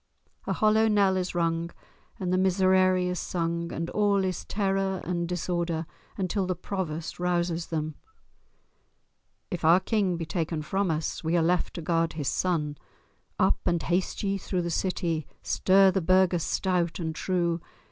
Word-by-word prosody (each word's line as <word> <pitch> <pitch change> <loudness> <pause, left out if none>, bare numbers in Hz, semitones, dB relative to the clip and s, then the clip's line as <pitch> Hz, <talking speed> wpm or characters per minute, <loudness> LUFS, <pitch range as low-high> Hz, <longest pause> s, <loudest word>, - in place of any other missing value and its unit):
A - - +1
hollow 215 +1 +3
knell 200 -3 +3
is 180 -1 -2
rung 165 0 0 0.5
and 180 -1 -1
the - - +3
miserere 185 0 +4
is 180 0 -1
sung, 170 -1 -2
and 165 +1 -3
all 205 -2 +2
is 185 -2 -2
terror 195 -2 0
and 170 -1 -2
disorder 170 -2 -1 0.3
until 190 0 -1
the 185 - -1
Provost 170 -3 -4
rouses 175 -1 0
them. 155 -1 -2 1.6
"If 175 - -4
our 165 +3 +6
King 190 -3 0
be 165 - -4
taken 160 -2 -2
from 195 +4 0
us, 160 +1 -2
We 165 +2 +1
are 165 - +3
left 175 +1 +1
to 170 - -5
guard 165 0 +1
his 150 -3 -2
son. 150 -6 -1 0.6
Up! - - +3
and 170 -1 +1
haste 180 +4 -1
ye 195 0 0
through 180 -1 -2
the 170 - -2
city, 165 -3 -1 0.2
Stir 190 0 +4
the 190 0 0
burghers 185 0 +3
stout 175 0 0
and 160 -3 -3
true! 170 -1 -1
180 Hz, 160 wpm, -27 LUFS, 165-190 Hz, 1.6 s, our